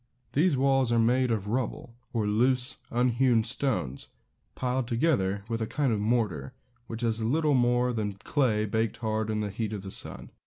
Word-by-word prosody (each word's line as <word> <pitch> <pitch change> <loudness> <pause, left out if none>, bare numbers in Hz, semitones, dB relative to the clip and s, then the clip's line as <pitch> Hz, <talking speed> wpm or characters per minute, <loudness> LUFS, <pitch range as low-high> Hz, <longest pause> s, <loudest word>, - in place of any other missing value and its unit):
These 155 0 +3
walls 135 -2 +2
are 120 - +3
made 125 +3 +3
of 105 -3 -1
rubble, 120 +1 -3 0.2
or 115 -3 -1
loose, 125 +4 +1
unhewn 120 -1 +2
stones, 115 - -1 0.5
piled 125 -1 -1
together 115 -7 +1
with 115 0 -3
a 110 - -1
kind 140 -3 0
of 105 - -1
mortar, 105 - -1 0.3
which 115 +1 -5
is 115 -1 +1
little 150 +7 +1
more 125 -1 +2
than 105 -3 -2
clay 110 +1 0
baked 110 +1 -1
hard 110 -1 -2
in 105 -1 -1
the 105 -1 -3
heat 110 +2 -3
of 100 -3 -5
the 95 - -7
sun. - - 0
115 Hz, 180 wpm, -28 LUFS, 110-130 Hz, 0.5 s, These